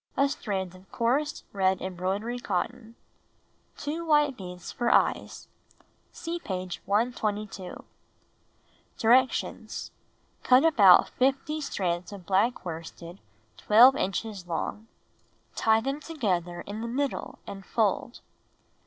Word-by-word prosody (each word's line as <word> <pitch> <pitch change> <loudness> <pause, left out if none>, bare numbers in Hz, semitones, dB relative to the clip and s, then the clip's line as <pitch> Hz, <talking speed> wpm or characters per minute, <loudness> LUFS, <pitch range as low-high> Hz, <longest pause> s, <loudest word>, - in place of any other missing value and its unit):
A 275 +1 +4
strand 190 -8 -3
of 185 +1 -17
coarse 270 +6 0
red 190 -1 +2
embroidery 190 +6 -3
cotton. 240 -1 -3 0.8
Two 310 +3 -4
white 295 -4 +3
beads 180 -3 -8
for 240 -1 -1
eyes. - - +1 0.6
(See 340 +1 -5
page 185 - -5
122.) 210 -3 -2 1.1
Directions: 250 +3 +1 0.6
1. 255 +1 +7
Cut - - +3
about 195 -8 +7
50 275 +4 0
strands 180 - -2
of 195 -3 -10
black 200 +4 +1
worsted 170 +2 -8 0.4
12 240 +5 +7
inches 195 -4 -3
long. 195 +6 -4 0.7
Tie 220 0 +3
them 275 +4 -2
together 185 - -2
in 210 +2 -6
the 235 - -3
middle 275 +4 -3
and 195 -1 -8
fold. 220 +3 -1
215 Hz, 110 wpm, -27 LUFS, 185-255 Hz, 1.1 s, 1